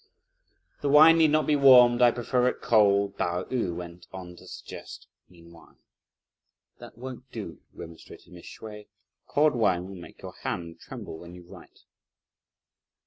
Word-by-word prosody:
"The 145 - -1
wine 155 +3 +7
need 160 -1 +5
not 155 +1 +1
be 150 - +2
warmed: 125 -3 +6
I 120 - +7
prefer 125 +1 -1
it - - -2
cold!" 100 -2 +2
Pao 90 +1 -1
yü 115 -10 -3
went 85 0 -10
on 90 -2 -10
to - - -16
suggest - - -11 0.2
meanwhile. 85 -1 -19 1.0
"That - - -13
won't 130 +1 -10
do," 100 -8 -8
remonstrated 85 +2 -13
Mrs. 85 - -13
Hsüeh; 105 -1 -10 0.4
"cold 150 +1 +2
wine 95 -7 0
will 100 - -10
make - - -15
your - - -8
hand 85 -1 -5
tremble 80 - -10
when 85 0 -12
you 90 - -13
write." 85 - -16
105 Hz, 150 wpm, -26 LUFS, 90-125 Hz, 1.0 s, wine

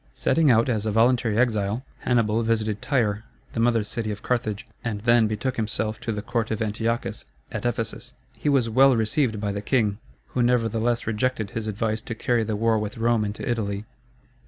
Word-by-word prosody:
Setting 160 -3 +3
out 115 0 +4
as 110 -4 0
a - - +1
voluntary 115 0 +3
exile, 110 0 +1
Hannibal 115 -2 +1
visited 110 -2 0
Tyre, 110 -6 0 0.3
the - - -3
mother 115 -1 +3
city 110 +1 -4
of 105 0 -5
Carthage, 110 -4 -1 0.2
and 105 -3 -3
then 120 0 +4
betook 115 +5 -2
himself 110 0 -1
to 120 -1 -3
the 105 -1 -4
court 115 -2 -1
of 110 - -2
Antiochus, 115 +2 -2 0.3
at - - -2
Ephesus. 115 +1 -3 0.2
He 150 - -2
was 135 -5 +3
well 130 +3 +5
received 110 0 +1
by 105 -1 -1
the 100 0 -3
king, 105 -3 +1 0.3
who 125 - -1
nevertheless 120 -1 +1
rejected 110 -1 -1
his 110 -1 -4
advice 110 +1 -1
to 115 - -6
carry 120 +1 +1
the 110 0 -2
war 110 +1 +2
with 105 +1 -4
Rome 115 -1 +2
into 105 +4 -4
Italy. 105 -4 -2
115 Hz, 185 wpm, -25 LUFS, 105-120 Hz, 0.3 s, well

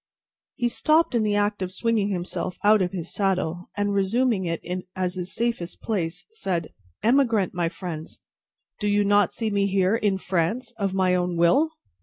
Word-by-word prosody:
He 240 -3 0
stopped 310 +6 +2
in 235 - +2
the 210 -1 +1
act 205 0 0
of 185 -1 -2
swinging 215 +1 0
himself 180 -1 -3
out 210 0 +5
of 180 -1 0
his 175 -3 -5
saddle, 180 -3 -1
and, 205 0 0
resuming 200 +1 +1
it 165 -1 -2 0.4
as 185 -1 -1
his 185 0 -4
safest 230 -7 -2
place, 180 -5 -2
said: 180 - -3 0.3
"Emigrant, 230 -5 +3
my 175 -2 0
friends! 165 -3 -7 0.6
Do 210 - -1
you 205 0 +3
not 205 -1 +3
see 220 -2 -2
me 200 -1 +2
here, 195 +1 +2
in 205 -4 +1
France, 190 +7 -1
of 200 -3 -2
my 185 -1 +3
own 180 -1 0
will?" 275 - +3
195 Hz, 175 wpm, -25 LUFS, 180-220 Hz, 0.6 s, out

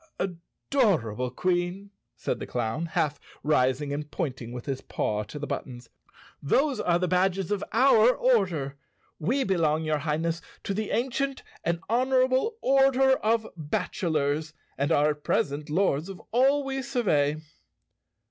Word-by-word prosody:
"Adorable 170 - -1
Queen," 180 +7 -1 0.2
said - - -3
the - - -6
clown, 120 +7 -2
half 150 -2 -1 0.2
rising 140 -1 +1
and 150 +1 -4
pointing 130 -9 -4
with 125 -1 -7
his 135 -2 -3
paw 105 0 -2
to 105 +8 -8
the 145 - -4
buttons, 120 -4 -6 0.5
"those 275 - +2
are 175 -1 +2
the 180 +1 0
badges 185 +1 +1
of 205 -1 0
our 250 -3 +6
order. 180 - +1 0.4
We 240 - +1
belong, 160 -6 +1
your 155 -1 0
Highness, 160 +2 -1 0.2
to 200 - -2
the 215 +1 -2
ancient 265 +3 -1 0.2
and 170 0 -1
honorable 260 - +2
Order 270 0 +4
of 225 0 +1
Bachelors, 155 -3 -1 0.2
and 140 +3 -1
are 150 -1 +4
at 150 0 -8
present 145 +2 -1
lords 165 -1 +1
of 195 - -8
all 270 +4 +3
we 270 0 -3
survey." 185 - +1
170 Hz, 140 wpm, -27 LUFS, 145-230 Hz, 0.5 s, our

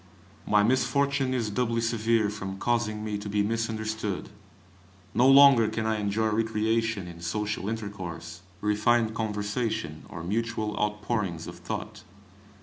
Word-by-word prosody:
My 105 -1 +4
misfortune 130 +3 +2
is 115 -5 -1
doubly 115 +1 0
severe 115 -2 +1
from 95 -2 -5
causing 110 -1 -1
me 105 -1 -2
to 105 - -6
be 105 0 +1
misunderstood. 110 -2 -2 0.8
No 125 - +4
longer 135 -4 +8
can 110 0 -2
I 110 -1 0
enjoy 105 +2 0
recreation 110 -2 0
in 85 -1 -10
social 105 +2 -2
intercourse, 95 -6 -6 0.2
refined 110 +2 +2
conversation, 110 -4 -3
or 85 -3 -7
mutual 110 +2 -2
outpourings 105 -5 -1
of - - -9
thought. - - -5
110 Hz, 130 wpm, -27 LUFS, 105-115 Hz, 0.8 s, longer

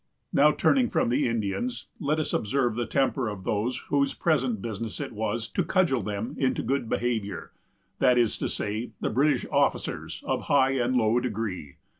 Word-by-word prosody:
Now, 150 +2 +6
turning 255 - +3
from - - +1
the 125 +3 +2
Indians, 115 - -2
let 150 -2 0
us 155 - -2
observe 120 +2 +1
the 120 0 -2
temper 135 -3 +1
of 100 -3 -7
those 110 +6 -1
whose 140 -1 +2
present 130 - +1
business 110 +1 -5
it - - -4
was 110 +1 -2
to 185 - 0
cudgel 170 -10 +2
them 105 +3 -4
into 130 -2 +1
good 135 -4 -1
behavior; 115 -4 -2 0.5
that 125 -2 +4
is 120 -3 +2
to - - -1
say, 110 +4 -3
the - - -1
British 140 +6 +2
officers, - - 0
of - - -1
high 135 -2 +4
and 130 -1 0
low 115 0 +3
degree. 105 - -4
120 Hz, 175 wpm, -27 LUFS, 110-140 Hz, 0.5 s, Now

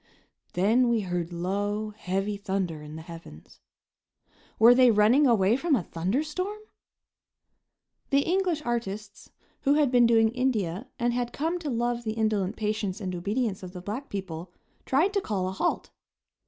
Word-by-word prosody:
Then 225 +7 +3
we 230 -2 +2
heard 180 -2 -3
low, 205 +5 -2
heavy 195 0 -2
thunder 190 -6 -3
in 150 +1 -9
the 160 - -8
heavens. 165 - -12 1.0
Were 230 +2 +8
they 250 0 +6
running 230 +7 +5
away 215 -2 +4
from 295 +3 +2
a 210 - -1
thunder 185 - -1
storm? 365 +7 -4 1.5
The 280 0 +4
English 350 -2 0
artists, 210 -3 -4 0.3
who 280 0 +2
had 295 -4 +3
been 245 -2 +5
doing 225 -1 +4
India 230 -5 -1
and 240 -2 0
had 240 0 -2
come 330 +4 -2
to 310 -4 -4
love 240 -1 -1
the 220 -1 -2
indolent 215 -3 0
patience 210 -2 -2
and 185 -3 -4
obedience 205 +3 -2
of 185 -1 -9
the 180 - -7
black 220 +9 -5
people, 180 -3 -6 0.4
tried 325 +10 +2
to 400 - +1
call 195 - -2
a - - -2
halt. 190 - -2
215 Hz, 160 wpm, -27 LUFS, 190-250 Hz, 1.5 s, Were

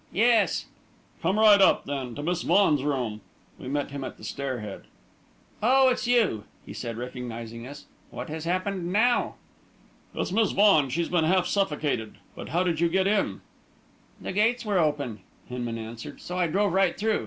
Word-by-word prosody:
"Yes." 225 -3 +3 0.6
"Come 185 +5 +1
right 210 -2 +7
up, 190 - +4
then, 135 -4 -4
to 145 - -5
Miss 175 +2 -1
Vaughan's 160 -8 +3
room." 125 -7 -2 0.4
We - - -8
met 145 +1 -2
him 140 -1 -5
at - - -7
the - - -16
stair 130 +3 -4
head. 105 -2 -8 0.8
"Oh, 260 +4 +5
it's 250 -1 -1
you!" 215 - +2 0.2
he - - -9
said, 115 -2 -5
recognising 120 -1 -6
us. 145 +1 -10 0.2
"What - - -7
has 155 +1 -6
happened 185 0 -2
now?" 235 +5 +2 0.8
"It's - - -2
Miss 220 +1 +2
Vaughan 195 -9 +5
she's 165 +6 -1
been 170 -3 +2
half 180 +2 +3
suffocated. 150 - -1 0.2
But - - -8
how 175 +3 +1
did 170 -3 -1
you 170 0 +3
get 190 +2 +1
in?" 205 +1 0 0.8
"The - - -5
gates 230 +4 +1
were 205 -3 +1
open," 145 -9 -1 0.3
Hinman 120 -2 -4
answered, 115 +1 -8
"so 180 - -7
I 180 -1 +1
drove 195 +3 +1
right 190 -2 +2
through. 220 +1 +1
165 Hz, 175 wpm, -26 LUFS, 130-200 Hz, 0.8 s, right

